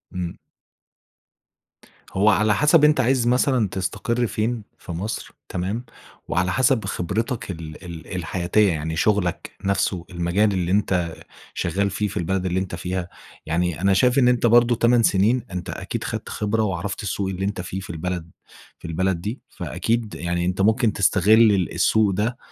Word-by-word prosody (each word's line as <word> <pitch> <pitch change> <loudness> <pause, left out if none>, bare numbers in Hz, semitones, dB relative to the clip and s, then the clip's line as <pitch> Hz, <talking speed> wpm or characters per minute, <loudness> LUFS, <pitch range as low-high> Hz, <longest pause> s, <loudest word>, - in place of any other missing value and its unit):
إمم. 90 -2 -4 1.8
هو 100 +3 +4
على 105 +1 +3
حسب 150 - +4
أنتَ 150 -1 +5
عايز 125 -1 +2
مثلًا 125 -2 +2
تستقر 105 +6 -1
فين 110 +1 -2
في - - -9
مصر 100 +7 -4 0.2
تمام، 100 +7 -3 0.4
وعلى 90 +1 0
حسب 125 0 +2
خبرتك 105 +5 -2
ال 80 -1 -9
ال 85 +2 -8
الحياتية، 90 +3 +1
يعني 80 +1 -3
شغلك 90 -1 0
نفسه، 100 -2 0
المجال 90 +4 +1
اللي 90 -2 -1
أنتَ 90 -4 +1 0.4
شغال 100 +4 0
فيه 105 +2 -1
في - - -6
البلد 95 +2 -1
اللي 90 0 0
أنتَ 95 -2 -4
فيها، 90 +1 -4 0.4
يعني 85 0 -1
أنا 100 0 +4
شايف 125 +7 +4
إن 125 - +4
أنتَ 125 -1 +2
برضه 120 +1 +5
8 120 +1 +3
سنين، 110 +5 +3
أنتَ 90 -1 -5
أكيد - - -4
أخدت - - -4
خبرة 105 +1 0
وعرفت 100 +1 -3
السوق 100 -1 -2
اللي 95 0 -3
أنتَ 100 -2 -2
فيه 95 +2 -5
في 95 - -9
البلد 85 0 -4 0.5
في - - -8
البلد 90 +1 -1
دي، 105 +8 -5
فأكيد 115 -2 -2
يعني 85 0 -2
أنتَ 90 +1 -1
ممكن 110 +2 +3
تستغل 110 +2 +5 0.2
السوق 110 -2 +3
ده 110 +6 -1
100 Hz, 160 wpm, -23 LUFS, 90-110 Hz, 1.8 s, أنتَ